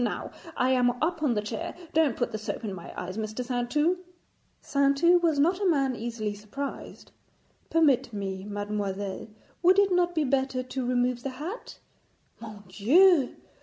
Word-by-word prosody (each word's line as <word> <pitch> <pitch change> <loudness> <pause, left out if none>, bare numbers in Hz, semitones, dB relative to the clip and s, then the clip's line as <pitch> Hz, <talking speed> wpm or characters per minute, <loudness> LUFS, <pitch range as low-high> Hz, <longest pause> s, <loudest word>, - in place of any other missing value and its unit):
Now, 235 - -3 0.3
I 255 +1 +2
am 250 -1 +4
up 330 0 -1
on 270 -6 +2
the 210 - -1
chair. 325 +11 -5 0.2
Don't 315 -6 +2
put 240 -1 -1
the 215 - -4
soap 215 - -5
in 200 - -3
my 175 -3 -9
eyes, 185 +3 -6
Mr. 215 +3 -4
Saintou.' 280 +8 0 0.6
Saintou 280 +5 +3
was 325 -4 +2
not 350 +7 +2
a 390 - +3
man 275 -5 +1
easily 225 -2 -4
surprised. 215 +8 -7 0.6
'Permit 295 -7 +3
me, 195 -2 -4
mademoiselle, 205 -1 -4 0.3
would 365 +2 +5
it 400 -1 +4
not 350 -1 +2
be 315 - +2
better 265 -1 0
to 255 0 -4
remove 245 0 +1
the 275 - -3
hat? 355 - -7 0.6
Mon 215 -3 -10
Dieu! 275 - +4
255 Hz, 165 wpm, -27 LUFS, 215-315 Hz, 0.6 s, would